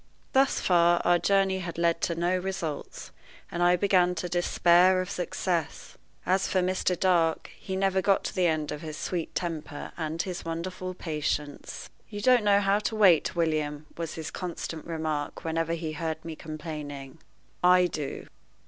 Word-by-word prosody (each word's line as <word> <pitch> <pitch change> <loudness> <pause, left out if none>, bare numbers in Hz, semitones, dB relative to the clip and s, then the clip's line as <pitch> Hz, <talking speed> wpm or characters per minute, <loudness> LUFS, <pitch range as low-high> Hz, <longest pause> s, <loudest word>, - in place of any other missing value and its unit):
Thus 270 +1 +3
far 175 -1 +4
our 175 0 +4
journey 195 -1 +2
had 170 -3 -6
led 170 -1 +1
to 170 - 0
no 175 +2 +1
results, 180 -5 -4 0.4
and 175 - -3
I 175 0 +5
began 180 -1 +3
to 180 +1 -3
despair 175 +1 +4
of 185 - -3
success. 175 -2 -3 0.3
As 190 +1 +2
for 185 - +1
Mr. 185 -1 0
Dark, 170 -4 +2
he 190 - -6
never 190 0 +1
got 195 +1 +2
to - - -4
the 180 -2 +2
end 155 -2 -1
of 150 - -5
his 155 -1 -6
sweet 170 -1 -3
temper 160 -4 -4
and 160 0 -3
his 180 0 -3
wonderful 180 +2 -4
patience. 150 -3 -4 0.2
"You 205 -2 -6
don't 245 +1 +4
know 205 -1 +4
how 200 +1 +2
to 215 +1 -2
wait, 190 -8 +4
William," 155 -3 -1
was 165 -1 -5
his 160 0 -5
constant 170 -3 -5
remark 155 -3 -3
whenever 165 0 -1
he 160 -1 -3
heard 160 +1 -4
me 165 -1 -5
complaining. 150 -3 -7 0.4
"I 180 0 +6
do." 150 -5 -4
170 Hz, 165 wpm, -28 LUFS, 160-185 Hz, 0.4 s, I